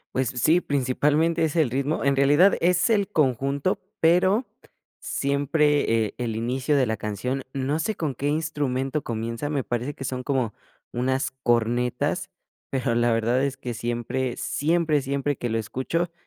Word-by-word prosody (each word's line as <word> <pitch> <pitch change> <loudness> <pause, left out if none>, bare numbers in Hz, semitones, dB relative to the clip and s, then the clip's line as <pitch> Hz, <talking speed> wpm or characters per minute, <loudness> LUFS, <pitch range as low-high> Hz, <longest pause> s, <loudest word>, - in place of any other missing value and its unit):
Pues 130 -3 +1
sí, 155 +7 +3
principalmente 150 +4 +1
es 160 -1 0
el 155 -7 +2
ritmo. 140 +4 -1
En 140 0 +3
realidad 145 +8 +5
es 180 +3 +3
el 200 -3 +2
conjunto, 140 - 0 0.2
pero 185 +8 +3 0.5
siempre, 140 -4 +1
eh, 105 - -6
el 115 -3 -2
inicio 125 +6 0
de 135 - +3
la 110 -1 -2
canción 105 +6 -3
no 140 +3 -1
sé 215 +6 -1
con 155 -4 -2
qué 140 +3 -3
instrumento 145 -2 -1
comienza, 115 +2 -4
me 145 -3 -1
parece 120 +5 -3
que - - -7
son 130 -1 -3
como 130 -5 -1 0.4
unas 130 +2 -1
cornetas, 120 +1 0 0.4
pero 130 -2 0
la 120 0 +2
verdad 115 +3 +1
es 135 -1 -1
que 125 -2 -5
siempre, 120 +2 -2
siempre, 160 -1 +1
siempre 140 +1 -1
que 120 - -3
lo 115 - 0
escucho, 130 - -2
135 Hz, 160 wpm, -25 LUFS, 120-150 Hz, 0.5 s, realidad